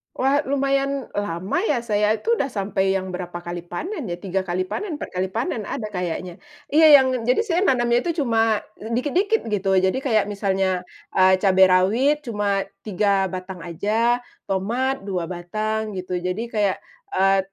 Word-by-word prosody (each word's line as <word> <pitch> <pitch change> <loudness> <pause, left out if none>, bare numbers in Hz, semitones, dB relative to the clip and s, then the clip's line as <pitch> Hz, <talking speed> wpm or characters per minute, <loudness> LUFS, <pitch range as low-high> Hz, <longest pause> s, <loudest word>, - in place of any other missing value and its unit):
Wah 275 +2 +2
lumayan 275 0 0
lama 200 - -2
ya 245 -5 0
saya 210 -1 +2
itu 465 - 0
sudah 275 - +1
sampai 195 -4 0
yang 190 -1 -3
berapa 180 -1 -6
kali 175 0 -5
panen 305 - -5
ya 175 - -3
3 190 +1 -3
kali 180 +1 0
panen 330 - -4
4 - - -7
kali 185 +1 -1
panen 220 +1 -3
ada 215 -2 -4
kayaknya. 180 -1 -4 0.3
Iya 315 +2 +6
yang 265 -2 +6 0.2
jadi 250 - +3
saya 355 -5 0
nanamnya 240 -2 +3
itu 325 +1 -1
cuma 225 -3 +2 0.2
dikit-dikit 290 - 0
gitu 195 -1 +1
jadi 190 +5 +2
kayak 225 -6 +2
misalnya, 190 -3 -1 0.3
eee, 185 0 +6
cabai 190 -1 +5
rawit 235 +12 +3
cuma 205 -4 0 0.2
3 200 -1 +1
batang 185 0 -7
aja, 220 +9 0 0.2
tomat 235 +6 -1
2 180 -4 -3
batang 215 +5 -3
gitu 180 0 -4
jadi 180 +5 -2
kayak, 210 -4 0 0.3
eee, 195 +1 +3
205 Hz, 160 wpm, -22 LUFS, 185-250 Hz, 0.3 s, Iya